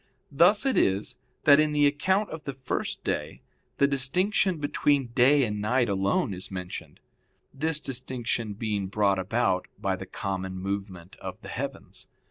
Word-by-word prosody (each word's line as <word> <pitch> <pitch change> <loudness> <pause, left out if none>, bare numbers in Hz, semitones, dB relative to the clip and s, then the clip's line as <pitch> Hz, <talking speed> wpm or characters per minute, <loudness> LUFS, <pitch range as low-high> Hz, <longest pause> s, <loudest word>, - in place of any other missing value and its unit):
Thus 180 - +5
it 270 - +2
is, 105 +6 0 0.2
that 145 0 +7
in 155 0 +2
the 145 0 +4
account 190 +9 +1
of 160 -1 -7
the 140 - -4
first 130 -1 -3
day - - -3 0.3
the 140 - +5
distinction 175 +8 +1
between 145 -3 +1
day 135 +4 +5
and 105 -3 -2
night 120 +2 +2
alone 100 +1 +1
is 95 +1 -6
mentioned; 90 -2 -7 0.5
this 155 +2 -1
distinction 120 -5 -3
being 105 -2 -2
brought 100 -1 +2
about 95 -1 0
by - - -1
the - - -8
common 95 -1 -4
movement 95 -2 -5
of - - -7
the - - -8
heavens. - - -6
125 Hz, 155 wpm, -27 LUFS, 100-145 Hz, 0.5 s, that